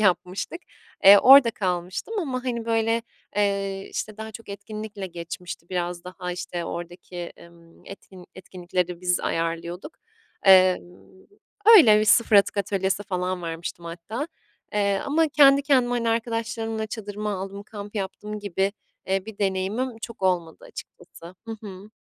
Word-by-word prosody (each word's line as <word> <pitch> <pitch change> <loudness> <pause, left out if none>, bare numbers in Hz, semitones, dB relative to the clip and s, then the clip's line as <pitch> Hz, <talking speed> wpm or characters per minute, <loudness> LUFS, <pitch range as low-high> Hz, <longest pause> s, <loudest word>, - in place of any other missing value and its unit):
yapmıştık. 185 - 0 0.4
Eee, 200 +1 +10
orada 265 0 +8
kalmıştım 185 - -3
ama, 260 -6 -3
hani, 235 -3 -2
böyle, 225 0 +1 0.3
eee, 195 -1 -1
işte, 215 -1 -4
daha 220 0 -7
çok 230 0 -11
etkinlikle 205 0 -7
geçmişti. 170 0 -8
Biraz 175 -1 -3
daha, 180 0 -6
işte, 175 -1 -5
oradaki, 175 +1 -7
ımm, 170 -1 -21
etkin 185 -2 -12
etkinlikleri 180 -1 -4
biz 180 -1 +1
ayarlıyorduk. 170 - -3 0.5
Emm, 185 -1 +3 0.5
öyle. 215 - +7
Bir 215 - +2
0 215 0 +5
atık 200 - +4
atölyesi 195 0 -1
falan 185 -2 -3
vermiştim 170 +1 -6
hatta, 180 - -5 0.4
eee, 200 -1 +1
ama 315 +3 +2
kendi 280 -1 +6
kendime, 255 -4 +2
hani, 235 -1 0
arkadaşlarımla 225 -1 -2
çadırımı 210 -1 -5
aldım, 195 +1 -5
kamp 205 0 -9
yaptım 210 +1 -5
gibi, 200 -1 -1 0.3
eee, 190 0 0
bir 220 -2 -9
deneyimim 205 +5 -1
çok 230 -2 -9
olmadı 175 -3 0
açıkçası. 165 - -12 0.2
Hı 225 -1 -5
hı. 200 -1 -10
200 Hz, 135 wpm, -24 LUFS, 180-225 Hz, 0.5 s, Eee